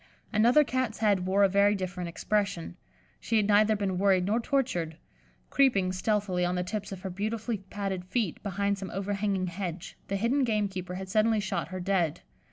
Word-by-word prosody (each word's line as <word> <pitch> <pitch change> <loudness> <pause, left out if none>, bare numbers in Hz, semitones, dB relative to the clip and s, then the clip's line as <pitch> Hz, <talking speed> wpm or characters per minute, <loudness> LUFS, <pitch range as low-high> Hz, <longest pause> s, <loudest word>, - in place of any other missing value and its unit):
Another 240 +8 +5
Cat's 255 -4 -1
head 200 -4 +2
wore 195 +2 +3
a - - +7
very 200 +2 +3
different 180 -2 -4
expression; 200 -1 -1 0.4
she 225 - 0
had 210 -2 +2
neither 215 +1 +4
been 195 -3 -1
worried 190 -2 +3
nor 215 +4 +1
tortured. 230 - -1 0.5
Creeping, 200 -10 +3
stealthily, 185 -1 0
on 175 +1 0
the 180 - 0
tips 205 +3 -4
of 190 -2 -7
her 190 -1 -5
beautifully 215 +3 -2
padded 195 -3 -3
feet, 200 -2 -2
behind 200 0 -1
some 190 -1 -5
overhanging 195 0 -1
hedge, 175 -1 -5
the 200 - -2
hidden 235 +7 +1
gamekeeper 195 -6 -1
had 190 +1 -6
suddenly 215 +3 +2
shot 195 -1 -2
her 185 0 -6
dead. 180 -4 0
200 Hz, 175 wpm, -28 LUFS, 185-215 Hz, 0.5 s, a